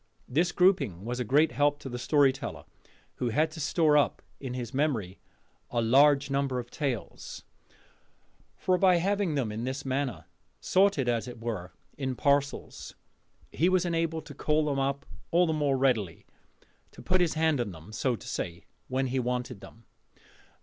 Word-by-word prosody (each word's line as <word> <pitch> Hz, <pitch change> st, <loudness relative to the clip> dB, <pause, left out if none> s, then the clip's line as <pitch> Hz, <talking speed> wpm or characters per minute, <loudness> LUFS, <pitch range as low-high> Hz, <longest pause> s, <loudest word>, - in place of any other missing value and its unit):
This 170 Hz, +7 st, +1 dB
grouping 180 Hz, -, +2 dB
was 125 Hz, +1 st, -3 dB
a -, -, 0 dB
great 145 Hz, +8 st, +3 dB
help 145 Hz, +4 st, +2 dB
to -, -, -7 dB
the 125 Hz, -1 st, -5 dB
storyteller, 135 Hz, 0 st, +1 dB, 0.5 s
who 125 Hz, -, -1 dB
had 155 Hz, +7 st, +1 dB
to 160 Hz, -, -9 dB
store 155 Hz, +1 st, +2 dB
up 145 Hz, -, 0 dB, 0.2 s
in 130 Hz, -2 st, -5 dB
his 125 Hz, 0 st, -5 dB
memory 125 Hz, -10 st, -1 dB, 0.5 s
a 120 Hz, -, -1 dB
large 140 Hz, +4 st, +4 dB
number 135 Hz, -2 st, 0 dB
of 120 Hz, -1 st, -5 dB
tales: 135 Hz, -7 st, -4 dB, 1.1 s
for 185 Hz, -1 st, +1 dB
by 185 Hz, -2 st, +5 dB
having 195 Hz, -1 st, 0 dB
them 125 Hz, -6 st, -1 dB
in 110 Hz, +2 st, -4 dB
this 135 Hz, +3 st, -4 dB
manner, 130 Hz, -, -2 dB, 0.3 s
sorted 190 Hz, -9 st, +2 dB
as 120 Hz, 0 st, 0 dB
it 120 Hz, -1 st, -8 dB
were 105 Hz, -6 st, -4 dB, 0.3 s
in 130 Hz, -2 st, -2 dB
parcels, 140 Hz, +1 st, -1 dB, 0.6 s
he 170 Hz, +4 st, +2 dB
was 185 Hz, -1 st, +2 dB
enabled 165 Hz, -2 st, -1 dB
to -, -, -9 dB
call 155 Hz, 0 st, +1 dB
them 140 Hz, -2 st, 0 dB
up 140 Hz, +1 st, -1 dB, 0.2 s
all 175 Hz, +1 st, +4 dB
the 160 Hz, -, 0 dB
more 145 Hz, -3 st, +1 dB
readily 115 Hz, -, 0 dB, 0.7 s
to -, -, -12 dB
put 185 Hz, 0 st, +2 dB
his 170 Hz, -3 st, +1 dB
hand 160 Hz, -4 st, +2 dB
on 115 Hz, -, -2 dB
them, 85 Hz, +2 st, -11 dB
so 120 Hz, +3 st, 0 dB
to 100 Hz, -, -12 dB
say 85 Hz, 0 st, -4 dB, 0.2 s
when 130 Hz, +1 st, 0 dB
he 130 Hz, 0 st, -1 dB
wanted 125 Hz, -4 st, -3 dB
them. 115 Hz, 0 st, -14 dB
135 Hz, 170 wpm, -28 LUFS, 120-155 Hz, 1.1 s, by